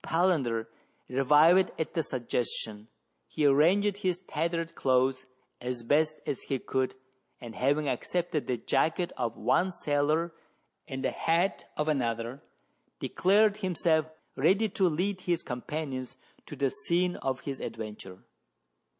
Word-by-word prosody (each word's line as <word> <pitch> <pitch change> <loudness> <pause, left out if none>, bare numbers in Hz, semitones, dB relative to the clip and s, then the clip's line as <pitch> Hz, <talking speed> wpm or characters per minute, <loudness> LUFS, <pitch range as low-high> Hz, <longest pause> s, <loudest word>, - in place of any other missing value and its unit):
Palander 150 -10 +1 0.4
revived 150 +8 +5
at 160 - -2
the 165 - +1
suggestion: 115 -5 -3 0.4
he 150 - -1
arranged 185 +9 +4
his 185 -4 0
tattered 170 -2 -2
clothes 130 0 +1 0.3
as 125 -1 -4
best 155 +5 +2
he 135 0 -2
could, 130 0 -1 0.4
and 115 -2 -9
having 140 +6 +1
accepted 160 +4 -1
the 125 - 0
jacket 165 +8 0
of 115 -1 -2
one 130 - +2
sailor 155 +1 0 0.5
and 135 -3 -5
the - - +1
hat 170 +3 0
of 150 - 0
another, 120 -2 -1 0.6
declared 205 +3 +3
himself 170 -5 +1 0.3
ready 210 +4 +3
to 190 -2 +2
lead 185 +4 -1
his 175 -2 -1
companions 130 0 -4 0.3
to - - -7
the 135 -1 0
scene 180 +1 0
of 130 -1 -2
his 135 -2 -5
adventure. 105 -4 -7
150 Hz, 125 wpm, -29 LUFS, 130-175 Hz, 0.6 s, revived